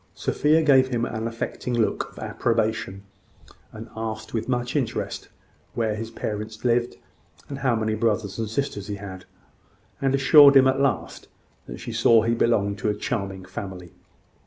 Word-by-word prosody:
Sophia 155 Hz, +2 st, +2 dB
gave 135 Hz, -3 st, +5 dB
him 120 Hz, -2 st, -1 dB
an 110 Hz, -1 st, -3 dB
affecting 115 Hz, +1 st, -4 dB
look 115 Hz, -2 st, 0 dB
of -, -, -21 dB
approbation, 110 Hz, -4 st, -1 dB, 0.7 s
and 110 Hz, +1 st, -9 dB
asked 110 Hz, -1 st, -5 dB
with 115 Hz, +2 st, -3 dB
much 125 Hz, +1 st, -1 dB
interest 135 Hz, -6 st, -3 dB, 0.5 s
where 110 Hz, -2 st, 0 dB
his 110 Hz, +1 st, -5 dB
parents 110 Hz, 0 st, -6 dB
lived, 120 Hz, 0 st, +1 dB, 0.5 s
and 140 Hz, -1 st, -6 dB
how 130 Hz, -3 st, +1 dB
many 110 Hz, -1 st, -1 dB
brothers 110 Hz, -2 st, -1 dB
and 110 Hz, -2 st, -2 dB
sisters 110 Hz, -4 st, -3 dB
he 105 Hz, -, -4 dB
had; 95 Hz, -3 st, -9 dB, 0.8 s
and 135 Hz, 0 st, +2 dB
assured 140 Hz, 0 st, +8 dB
him, 130 Hz, -, +6 dB
at 135 Hz, +1 st, +1 dB
last, 135 Hz, -6 st, -1 dB, 0.4 s
that -, -, -8 dB
she -, -, -6 dB
saw 115 Hz, -2 st, +4 dB
he 115 Hz, +1 st, +1 dB
belonged 105 Hz, -4 st, +1 dB
to 105 Hz, -, 0 dB
a 105 Hz, -, 0 dB
charming 100 Hz, -4 st, -4 dB
family. 95 Hz, -2 st, -8 dB
115 Hz, 160 wpm, -24 LUFS, 105-125 Hz, 0.8 s, assured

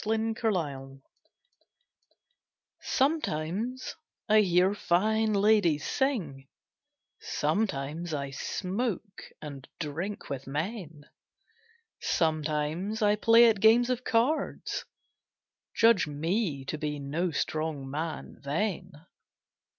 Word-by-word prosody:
STRONG 220 Hz, +1 st, 0 dB
MOMENTS 140 Hz, -, -2 dB, 1.8 s
Sometimes 250 Hz, -, -1 dB, 0.3 s
I 215 Hz, -1 st, +6 dB
hear 180 Hz, 0 st, +3 dB
fine 215 Hz, +4 st, +1 dB
ladies 200 Hz, -7 st, +3 dB
sing, 175 Hz, -, -1 dB, 0.7 s
Sometimes 165 Hz, -5 st, -1 dB
I 140 Hz, -2 st, -3 dB
smoke 200 Hz, -, -3 dB, 0.2 s
and 140 Hz, -3 st, -8 dB
drink 170 Hz, +6 st, -4 dB
with 135 Hz, -1 st, -5 dB
men; 155 Hz, 0 st, -4 dB, 0.9 s
Sometimes 155 Hz, +6 st, 0 dB
I 205 Hz, 0 st, +4 dB
play 230 Hz, +2 st, +6 dB
at 220 Hz, -3 st, +3 dB
games 235 Hz, +3 st, +5 dB
of 250 Hz, 0 st, -2 dB
cards 250 Hz, +7 st, 0 dB, 0.9 s
Judge 225 Hz, -7 st, +5 dB
me 155 Hz, 0 st, -1 dB
to 150 Hz, +2 st, -4 dB
be 150 Hz, -1 st, -2 dB
no 150 Hz, +6 st, -1 dB
strong 155 Hz, -2 st, -2 dB
man 155 Hz, +4 st, -5 dB
then. 170 Hz, +1 st, -3 dB
175 Hz, 90 wpm, -29 LUFS, 150-220 Hz, 1.8 s, I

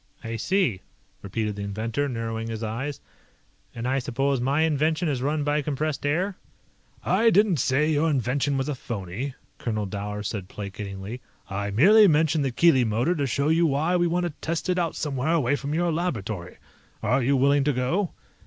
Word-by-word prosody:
"I 115 Hz, 0 st, -4 dB
see," 130 Hz, -, +1 dB, 0.4 s
repeated 105 Hz, +1 st, -3 dB
the 100 Hz, -, -6 dB
inventor, 110 Hz, +7 st, -2 dB
narrowing 115 Hz, -2 st, -3 dB
his 115 Hz, 0 st, -4 dB
eyes. 130 Hz, +6 st, -4 dB, 0.7 s
"And 115 Hz, +1 st, -3 dB
I 135 Hz, +1 st, +1 dB
suppose 135 Hz, +2 st, 0 dB
my 140 Hz, +5 st, +1 dB
invention 160 Hz, +2 st, +1 dB
is 135 Hz, -5 st, -1 dB
run 150 Hz, +2 st, 0 dB
by 145 Hz, +1 st, +1 dB
compressed 150 Hz, 0 st, -2 dB
air?" 180 Hz, +6 st, 0 dB, 0.7 s
"I 230 Hz, +1 st, +4 dB
didn't 205 Hz, -4 st, +4 dB
say 145 Hz, +6 st, +2 dB
your 155 Hz, +2 st, +2 dB
invention 140 Hz, +1 st, 0 dB
was 135 Hz, -, -1 dB
a 150 Hz, -, -1 dB
phony," 120 Hz, +2 st, -5 dB, 0.2 s
Colonel 110 Hz, -3 st, -2 dB
Dower 105 Hz, +1 st, -4 dB
said 100 Hz, -3 st, -4 dB
placatingly. 100 Hz, +3 st, -6 dB, 0.3 s
"I 100 Hz, +1 st, -2 dB
merely 200 Hz, -, +6 dB
mentioned 155 Hz, -2 st, +3 dB
the 135 Hz, -, +1 dB
Keely 130 Hz, 0 st, +4 dB
Motor 120 Hz, +9 st, +1 dB
to 145 Hz, -5 st, -1 dB
show 140 Hz, +4 st, 0 dB
you 165 Hz, +1 st, +4 dB
why 155 Hz, +5 st, +1 dB
we 175 Hz, -1 st, +3 dB
want 175 Hz, +1 st, 0 dB
to 175 Hz, -, -2 dB
test 165 Hz, +2 st, -2 dB
it 180 Hz, 0 st, +2 dB
out 170 Hz, -2 st, -1 dB
somewhere 145 Hz, +1 st, -1 dB
away 145 Hz, -4 st, +2 dB
from 145 Hz, +1 st, -3 dB
your 175 Hz, +1 st, +1 dB
laboratory. 110 Hz, -, -3 dB, 0.5 s
Are 125 Hz, +5 st, +2 dB
you 135 Hz, +3 st, +2 dB
willing 140 Hz, +2 st, +4 dB
to 145 Hz, -, +3 dB
go?" 155 Hz, +9 st, -1 dB
140 Hz, 180 wpm, -25 LUFS, 115-155 Hz, 0.7 s, merely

